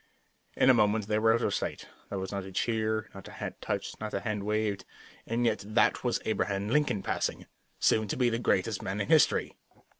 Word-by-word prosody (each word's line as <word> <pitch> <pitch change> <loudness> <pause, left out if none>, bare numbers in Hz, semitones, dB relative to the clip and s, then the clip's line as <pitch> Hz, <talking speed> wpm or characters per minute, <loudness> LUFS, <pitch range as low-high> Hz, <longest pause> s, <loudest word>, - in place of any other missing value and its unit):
In 130 - +6
a - - +6
moment 105 -2 +2
they 105 0 +1
were 110 +1 +4
out 115 - +2
of - - +1
sight. - - -3 0.2
There 100 - -3
was 95 0 -4
not 100 -1 -3
a 95 - -9
cheer, 110 +1 -1
not 95 - -10
a - - -11
hat - - -6
touched, - - -3
not 110 0 -4
a - - -1
hand 105 -3 -2
waved, 105 -2 -1 0.4
and 120 +1 0
yet 110 -3 +1
that 110 +3 +2
was 120 -2 +1
Abraham 100 -1 -1
Lincoln 125 -7 +1
passing, - - -2 0.3
soon 110 -1 +3
to - - -3
be 125 -2 +2
the 115 - -1
greatest 105 -2 +1
man 95 +2 -3
in 100 - -2
history. 160 -2 +3
110 Hz, 215 wpm, -29 LUFS, 100-115 Hz, 0.4 s, In